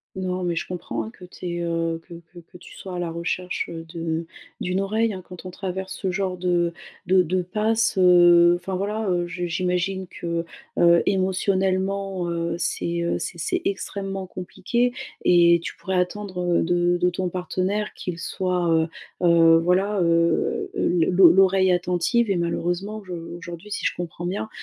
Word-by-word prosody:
Non, 185 -1 -2
mais 175 -1 -1
je - - -3
comprends, 120 -11 -4
hein, - - -7
que 180 - -13
tu 180 0 -9
aies, 175 0 -3
heu, 165 -1 -1
que 175 - -10
que 170 +1 -14
que 175 +1 -13
tu - - -14
sois 185 -2 -7
à - - -3
la 175 -1 -2
recherche 170 +2 -3
de 165 0 -4 0.3
d'une 180 +1 -1
oreille, 220 +3 +1
hein. 185 -3 -7
Quand 180 0 -9
on - - -5
traverse 190 +1 -5
ce 190 - -2
genre 185 -1 -2
de 175 -1 +1 0.4
de 185 0 +5
de 185 +3 0
passe 220 +4 0
heu, 175 -1 +7
enfin, 185 +2 -5
voilà, 205 +2 -2
heu, 175 -1 +1
je 175 0 -4
j'imagine 180 +2 -1
que, 170 -1 -4 0.3
heu, 170 0 +6
émotionnellement, 190 -1 0
heu, 170 0 -2
c'est, 170 -1 -1
heu, 170 - 0
c'est - - -5
c'est 365 -4 -1
extrêmement 195 -1 -3
compliqué 235 +7 -1 0.3
et 170 -1 +6
tu - - -5
pourrais 190 -1 -2
attendre 180 -2 0
de 175 +1 +2
de 180 - +4
ton 180 0 -2
partenaire 185 +3 -2
qu'il 175 -2 -5
soit, 180 -1 -1
heu 160 0 +3 0.4
heu, 165 -1 +6
voilà, 190 +4 +1
heu 170 -1 +1
heu, - - +1
l' - - +3
l'o 180 -2 +7
l'oreille 190 0 +4
attentive. 180 +6 +1
Et 195 - +2
malheureusement, 175 +5 -2
je 185 -2 -8
aujourd'hui, 170 +3 -8
si - - -3
je - - 0
comprends 175 0 -5
bien, 195 +4 -3
180 Hz, 180 wpm, -24 LUFS, 170-190 Hz, 0.4 s, heu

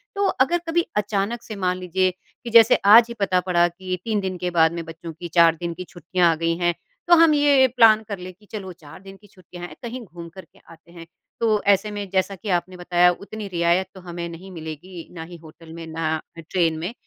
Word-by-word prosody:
तो 400 0 0
अगर 310 +1 +1
कभी 340 +1 +1
अचानक 210 +3 -1
से 215 - -8
मान 185 -2 -1
लीजिए 185 +1 0 0.3
कि 235 - -6
जैसे 230 +1 +7 0.2
आज 230 0 +9
ही - - -5
पता 185 -2 +2
पड़ा 175 -1 +4
की 185 +1 -5
3 220 -2 -1
दिन 190 -2 -4
के 180 0 -3
बाद 160 0 +5
में 170 -1 -5
बच्चों 165 +1 -9
की 175 +2 -8
4 165 -1 +6
दिन 170 +1 -5
की 180 - -7
छुट्टियाँ 175 -1 +1
आ - - 0
गई 165 +1 -1
हैं 175 -1 +1 0.3
तो 345 - +7
हम 325 -2 +5
ये 285 -3 +4
प्लान 220 -2 +6
कर 200 -2 -6
ले 185 +1 -8
की 205 +4 -24
चलो 195 -4 -6
4 165 0 -15
दिन 195 0 -13
की 205 - -20
छुट्टियाँ 180 -3 -12
हैं - - -13
कहीं 240 +2 -6
घूम 170 -2 -11
करके 190 +2 -15
आते 165 +1 -18
हैं 170 -1 -11 0.3
तो 220 -3 +1
ऐसे 210 +2 -2
में 205 -1 -5
जैसा 195 +1 0
कि 205 +2 -8
आपने 180 +1 -8
बताया 180 0 +3
उतनी 205 +3 -8
रियायत 175 +1 +1
तो 190 - -11
हमें 170 -1 -6
नहीं 180 +3 -11
मिलेगी 165 +1 -9
ना 160 - -6
ही 170 +1 -11
होटल 160 0 -15
में, 165 0 -8
ना 160 -1 -2 0.3
ट्रेन 165 -3 +1
में। 180 +8 -4
185 Hz, 230 wpm, -22 LUFS, 170-210 Hz, 0.3 s, आज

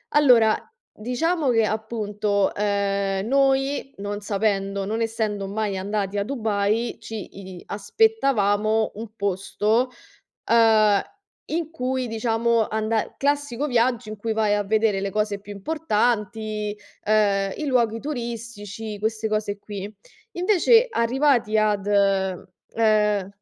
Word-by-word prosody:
Allora, 245 -7 +6 0.4
diciamo 285 +7 -1
che, 225 -2 +3
appunto, 210 -2 -1
ehm, 200 -1 0
noi, 270 +1 +1
non 205 +1 -4
sapendo, 200 -1 -1
non 220 +3 -2
essendo 220 -3 -2
mai 205 -1 -2
andati 200 +1 -2
a 200 - +1
Dubai, 220 -2 -1
ci 220 -3 -6 0.3
i - - -12
aspettavamo 215 - +1
un 220 +1 -7
posto, 210 +4 0 0.6
ehm, 220 -3 +4 0.5
in 320 0 -2
cui, 255 -3 -2
diciamo, 225 0 +1
anda 220 0 -1
classico 285 -1 0
viaggio 240 -3 +1
in 215 - -6
cui 220 +2 -3
vai 215 -1 +2
a 205 - +1
vedere 210 -1 +1
le 200 0 -2
cose 210 -1 -1
più 205 +1 -10
importanti, 215 -4 -1 0.3
ehm, 200 -2 +2
i 305 - -4
luoghi 235 -4 +1
turistici, 230 -5 -6
queste 220 +1 -1
cose 215 -1 -2
qui. 205 0 -7 0.4
Invece, 425 +6 +4
arrivati 240 - +2
ad, 210 -2 +1
ehm 200 +1 +1
215 Hz, 120 wpm, -23 LUFS, 205-235 Hz, 0.6 s, Allora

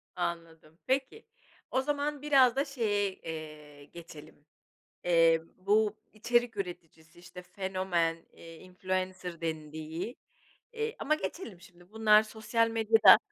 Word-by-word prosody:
Anladım. 165 -2 -5
Peki, 265 - -1 0.5
o 260 - +2
zaman 290 0 -2
biraz 270 -5 +5
da 275 +2 +1
şeye, 205 -7 -1
eee, 150 -3 -9
geçelim, 160 -2 -13 0.6
eee, 165 -2 +4 0.2
bu 210 +2 +2 0.2
içerik 240 +1 0
üreticisi, 170 -3 -8
işte, 180 +1 -11
fenomen, 180 -2 -1 0.2
influencer 185 +1 -5
dendiği 160 - -5 0.6
Eee, 450 0 -3
ama 310 +2 +1
geçelim 230 - -6
şimdi 175 +1 -18
bunlar 215 -1 +5
sosyal 220 +1 0
medyada 225 -1 +7
185 Hz, 110 wpm, -30 LUFS, 165-230 Hz, 0.6 s, medyada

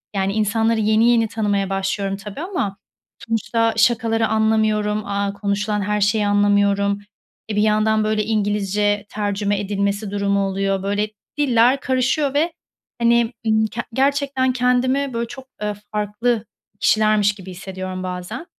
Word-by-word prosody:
yani, 195 0 0
insanları 220 +1 +1
yeni 220 +2 +3
yeni 230 -2 +3
tanımaya 205 -3 -1
başlıyorum 195 0 -2
tabii 205 +6 -9
ama 220 - -3 0.5
sonuçta 225 0 0
şakaları 225 -1 +2
anlamıyorum, 215 -1 +1
aaa, 200 0 -1
konuşulan 205 +1 -1
her 210 +1 -1
şeyi 210 0 +2
anlamıyorum. 205 0 +2 0.5
E, 210 - -2
bir 210 - +2
yandan, 215 0 +2
böyle, 215 0 +1
İngilizce 205 -1 0
tercüme 205 -1 -1
edilmesi 200 0 -2
durumu 200 -1 +1
oluyor. 195 0 -1
Böyle, 205 +1 -1 0.3
diller 255 -1 +3
karışıyor 265 +2 0
ve, 320 +3 +1 0.5
hani, 235 0 +3
ımm, 220 0 +3
k 240 +2 -5
gerçekten 270 -1 +1
kendimi, 255 +2 +1
böyle, 235 0 -2
çok, 265 +2 -10 0.2
eee, 210 0 -1 0.2
farklı 210 +2 -1 0.3
kişilermiş 215 -1 +3
gibi 190 -2 -10
hissediyorum 185 0 -6
bazen. 185 - -5
210 Hz, 135 wpm, -21 LUFS, 200-230 Hz, 0.5 s, yeni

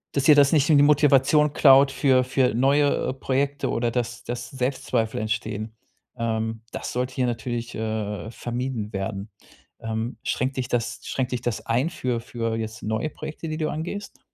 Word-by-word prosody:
Dass 140 - +1
dir 150 - +8
das 145 -1 +5
nicht 150 -2 +3
i - - +6
die 140 - +6
Motivation 145 0 +4
klaut 135 -1 +6
für 130 -2 +3
für 125 -2 +1
neue 140 +2 +2
Projekte 140 +2 -1
oder 115 0 0
dass 120 0 -3
dass 120 0 -5
Selbstzweifel 125 -3 -1
entstehen. 110 0 -3 0.5
Ähm, 115 -1 -2
das - - -5
sollte 125 +1 -2
hier 130 -1 0
natürlich, 120 0 -3
äh, 110 -1 -3
vermieden 120 -2 -4
werden. 100 +1 -4 0.5
Ähm, 115 +2 -4
schränkt 130 +2 -1
dich 130 -2 -1
das 120 -2 -2
schränkt 130 -2 -2
dich 125 - -2
das 120 -3 -3
ein 125 +8 +1
für 125 -7 -2
für 115 -1 -3
jetzt 110 +1 -5
neue 110 +8 -2
Projekte, 155 +1 -7
die 155 - -3
du 155 -1 -1
angehst? 180 +6 -5
125 Hz, 170 wpm, -24 LUFS, 115-140 Hz, 0.5 s, dir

